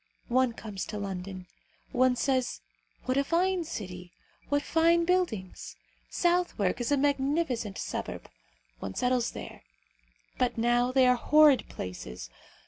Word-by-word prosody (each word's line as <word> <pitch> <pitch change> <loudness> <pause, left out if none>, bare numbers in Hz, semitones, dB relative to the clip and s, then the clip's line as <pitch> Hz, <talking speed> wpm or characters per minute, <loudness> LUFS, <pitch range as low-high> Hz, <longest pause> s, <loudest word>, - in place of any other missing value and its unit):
One 255 0 +2
comes 210 -4 -6
to 210 - -5
London. 190 -2 -5 0.5
One 255 0 +3
says: 255 - 0 0.4
What 255 +1 0
a 280 - +3
fine 350 +3 +1
city! 180 - -7 0.4
What 285 0 +1
fine 335 +1 +3
buildings! 335 - -1 0.3
Southwark 345 - +1
is 240 - -1
a 285 - +4
magnificent 275 -5 0
suburb. - - -5 0.5
One 95 +6 -6
settles 250 -1 +1
there. - - -9 0.8
But 250 -1 +1
now 240 +2 +2
they 260 0 +4
are 250 0 +5
horrid 300 +1 +5
places. 60 -9 -7
250 Hz, 130 wpm, -29 LUFS, 205-290 Hz, 0.8 s, are